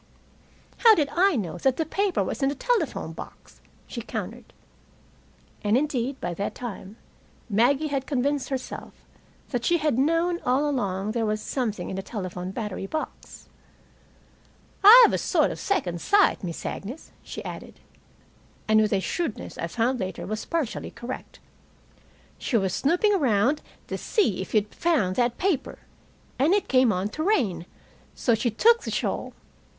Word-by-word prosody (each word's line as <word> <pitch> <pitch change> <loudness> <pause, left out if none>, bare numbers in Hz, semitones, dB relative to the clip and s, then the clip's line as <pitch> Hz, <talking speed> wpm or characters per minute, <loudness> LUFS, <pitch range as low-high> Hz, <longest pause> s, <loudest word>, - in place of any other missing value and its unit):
"How 455 -2 +7
did 295 -5 +1
I 375 0 +3
know 180 -7 -3
that 270 - +1
paper 395 -2 +1
was - - -4
in 270 - +3
the 285 - -3
telephone - - -1
box?" - - -12 0.2
she - - -6
countered. - - -6 1.1
And, 210 +3 +3
indeed, 270 -2 -1
by 175 - -3
that 200 +4 -4
time 215 -3 -7 0.5
Maggie 265 +8 +3
had 275 -2 -2
convinced 280 0 0
herself 265 -2 -5 0.6
that 245 -3 -2
she 345 +7 +3
had 300 -6 0
known 330 +4 +2
all 265 +4 +2
along 205 -7 -1
there 225 -1 -1
was 215 0 0
something 225 -2 -3
in - - -4
the - - -2
telephone 185 -3 -5
battery 200 -1 -4
box. 310 +9 -6 1.4
"I've 470 +5 +10
a - - +1
sort - - +2
of - - -7
second 175 - -1
sight, 405 - +3
Miss 170 -3 -5
Agnes," 245 +11 -6
she - - -8
added. - - -8 0.9
And, 215 0 +5
with 215 -1 +1
a 195 - +2
shrewdness 320 - -3
I 170 - -2
found 240 +7 0
later 185 -2 -4
was 215 +2 -4
partially 325 -8 -2
correct: 245 +2 -8 1.0
"She 235 - 0
was 190 -4 0
snooping 355 - +2
around 265 - +2 0.2
to - - -5
see 230 - +1
if 190 - -6
you'd 210 0 +1
found 235 - +1
that 240 -1 +1
paper, 365 -7 -1 0.6
and 310 +9 +4
it 410 - 0
came 255 -3 +4
on 190 +1 -1
to 310 - -5
rain; 235 - +1 0.5
so 240 - +1
she 225 +2 +1
took 460 - +4
the - - -5
shawl. - - -2
250 Hz, 155 wpm, -25 LUFS, 210-315 Hz, 1.4 s, I've